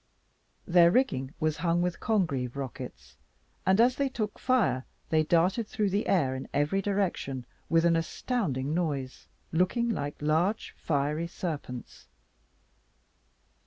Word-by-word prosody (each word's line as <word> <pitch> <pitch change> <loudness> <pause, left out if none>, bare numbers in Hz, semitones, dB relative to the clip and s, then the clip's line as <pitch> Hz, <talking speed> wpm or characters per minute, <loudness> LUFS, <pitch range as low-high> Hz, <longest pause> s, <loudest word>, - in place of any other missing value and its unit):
Their 175 -1 +6
rigging 145 - +1
was 155 -1 0
hung 170 +1 +1
with 180 -1 -2
Congreve 140 - 0
rockets; 65 - -7 0.5
and 190 +2 +4
as 245 +2 +5
they 280 -1 +1
took 215 -5 -4
fire, 240 - +2 0.3
they 160 -1 +4
darted 175 +7 +2
through 210 -3 -1
the 205 +3 0
air 145 -9 +2
in 130 0 -5
every 150 +7 +2
direction 185 -10 -1 0.2
with 165 +1 +4
an 170 -1 +4
astounding 165 - -1
noise, 145 -7 -2 0.2
looking 185 +8 +1
like 145 -10 -3
large 160 +8 0
fiery 150 +2 -1
serpents. 150 -8 -6
170 Hz, 125 wpm, -29 LUFS, 140-195 Hz, 0.5 s, Their